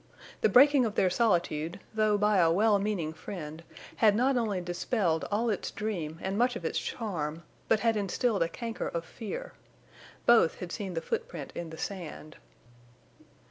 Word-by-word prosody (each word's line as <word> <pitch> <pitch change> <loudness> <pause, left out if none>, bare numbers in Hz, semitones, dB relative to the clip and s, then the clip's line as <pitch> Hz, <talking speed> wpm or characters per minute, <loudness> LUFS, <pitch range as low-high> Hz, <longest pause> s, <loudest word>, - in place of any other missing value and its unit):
The - - +4
breaking 275 +5 +6
of 220 -3 -2
their 185 - +3
solitude, 175 -6 +1
though 215 -1 +2
by 210 0 +3
a 165 -2 +5
well 205 +3 +4
meaning 195 -6 -2
friend, 160 -2 -7 0.4
had 215 -2 +5
not 260 +4 +3
only 220 -6 0
dispelled 175 -1 -1
all 225 +3 +1
its 200 - -2
dream 175 -8 -4
and 195 +2 -1
much 245 0 +3
of 175 - -6
its - - 0
charm, 170 -8 -4 0.2
but 220 - +3
had 230 -1 +2
instilled 205 +1 0
a 165 - +2
canker 230 +4 -4
of 170 0 -4
fear. - - -7 0.7
Both 235 -9 +5
had 180 -1 -7
seen 190 -4 -4
the 165 - -1
footprint 465 - -4
in 170 -1 -5
the 160 - -9
sand. 160 -5 -6
200 Hz, 170 wpm, -29 LUFS, 170-225 Hz, 0.7 s, breaking